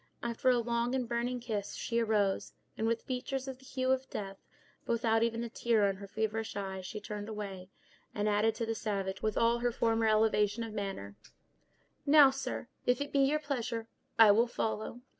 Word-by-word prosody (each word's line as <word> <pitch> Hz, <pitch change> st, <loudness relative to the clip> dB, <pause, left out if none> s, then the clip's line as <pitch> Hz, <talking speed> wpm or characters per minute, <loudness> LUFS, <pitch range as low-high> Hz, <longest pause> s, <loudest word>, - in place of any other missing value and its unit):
After 235 Hz, +2 st, +1 dB
a 250 Hz, -, +5 dB
long 235 Hz, +1 st, 0 dB
and 250 Hz, -2 st, -1 dB
burning 240 Hz, +1 st, -1 dB
kiss, 215 Hz, -4 st, -4 dB
she 235 Hz, 0 st, -1 dB
arose, 210 Hz, -4 st, +1 dB, 0.2 s
and 220 Hz, -, -1 dB
with 230 Hz, 0 st, 0 dB
features 260 Hz, +1 st, -3 dB
of 260 Hz, -1 st, -6 dB
the 265 Hz, -, -18 dB
hue 260 Hz, 0 st, -1 dB
of 265 Hz, 0 st, 0 dB
death, 195 Hz, -1 st, -5 dB, 0.5 s
but -, -, 0 dB
without 225 Hz, -1 st, +2 dB
even 230 Hz, 0 st, 0 dB
a -, -, -3 dB
tear 225 Hz, -2 st, +2 dB
in 195 Hz, -1 st, -1 dB
her 200 Hz, 0 st, -9 dB
feverish 220 Hz, +2 st, -2 dB
eye, 190 Hz, -1 st, -4 dB
she 190 Hz, +3 st, -6 dB
turned 210 Hz, 0 st, -6 dB
away, 195 Hz, -4 st, -6 dB, 0.5 s
and 210 Hz, 0 st, 0 dB
added, 210 Hz, +1 st, +2 dB
to 230 Hz, -, -2 dB
the 225 Hz, -, -1 dB
savage, 195 Hz, -3 st, -3 dB
with 215 Hz, -1 st, -1 dB
all 230 Hz, +1 st, +3 dB
her 245 Hz, 0 st, +1 dB
former 225 Hz, -1 st, +1 dB
elevation 215 Hz, 0 st, +3 dB
of 225 Hz, -2 st, -6 dB
manner: 195 Hz, -, -5 dB, 0.9 s
"Now, 290 Hz, -2 st, +7 dB
sir, 270 Hz, -2 st, -4 dB, 0.2 s
if 245 Hz, 0 st, +3 dB
it 285 Hz, 0 st, -4 dB
be 280 Hz, -, +3 dB
your 275 Hz, +2 st, +4 dB
pleasure, 245 Hz, -6 st, -3 dB, 0.3 s
I 225 Hz, -2 st, +9 dB
will 230 Hz, +4 st, +4 dB
follow." 225 Hz, 0 st, -3 dB
225 Hz, 195 wpm, -32 LUFS, 210-245 Hz, 0.9 s, I